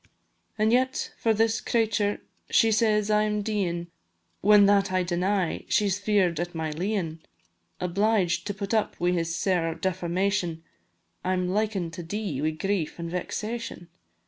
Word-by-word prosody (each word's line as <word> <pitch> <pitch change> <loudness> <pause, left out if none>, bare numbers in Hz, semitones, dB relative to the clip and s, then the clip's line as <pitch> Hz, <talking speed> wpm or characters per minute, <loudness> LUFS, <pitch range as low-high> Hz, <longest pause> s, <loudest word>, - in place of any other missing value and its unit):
An' 215 +1 +2
yet 255 +2 +1
for 225 - +2
this 220 +1 +2
cratur' 215 -3 0 0.3
she 225 - +4
says 215 -1 +2
I 210 0 +4
am 210 -1 0
deein', 185 -5 -1 0.6
When 205 0 +7
that 200 -1 +3
I 185 0 +2
deny, 180 +1 0
she 210 - +3
's 190 +1 -1
fear'd 195 -6 +2
at 175 0 -3
my 160 -1 -2
leein'; 170 -1 -2 0.6
Obliged 180 -1 +1
to 205 - -2
put 200 +1 -4
up 220 -1 0
wi' 175 +1 +2
this 165 -1 -1
sair 175 -5 0
defamation, 180 -1 -1 0.6
I'm 185 0 0
liken 195 -3 -1
to 170 - -7
dee 175 -4 -3
wi' 155 - +2
grief 170 +1 -2
an' 170 0 -4
vexation. 210 +1 -4
195 Hz, 150 wpm, -26 LUFS, 175-210 Hz, 0.6 s, When